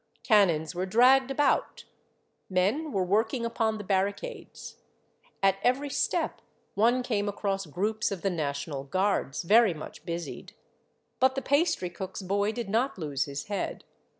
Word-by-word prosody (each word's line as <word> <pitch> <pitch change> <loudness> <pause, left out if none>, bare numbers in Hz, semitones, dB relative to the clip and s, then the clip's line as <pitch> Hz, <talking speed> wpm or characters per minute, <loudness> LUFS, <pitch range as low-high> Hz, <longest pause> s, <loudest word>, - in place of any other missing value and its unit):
Cannons 170 -9 +3
were 180 +2 -2
dragged 255 +6 +5
about, 285 +1 0 0.6
men 205 +13 0
were 195 -5 0
working 220 +6 +1
upon 225 -1 0
the 210 - -6
barricades; 200 - -3 0.7
at 195 0 +4
every 275 +5 +1
step - - -1 0.3
one 240 +4 +3
came 210 -5 -1
across 195 -2 -2
groups 210 +8 -1
of 195 -4 -5
the 195 - +1
national 140 -3 -3
guards, 170 -2 -1
very 210 0 +5
much 155 - -9
busied. 170 0 -6 0.7
But 260 0 +3
the 270 - -3
pastry 285 - +1
cook's 190 +2 -6
boy 200 +3 0
did 235 -1 -5
not 230 +6 0
lose 145 -5 -2
his 140 0 -5
head. 205 -1 -4
200 Hz, 145 wpm, -28 LUFS, 180-235 Hz, 0.7 s, dragged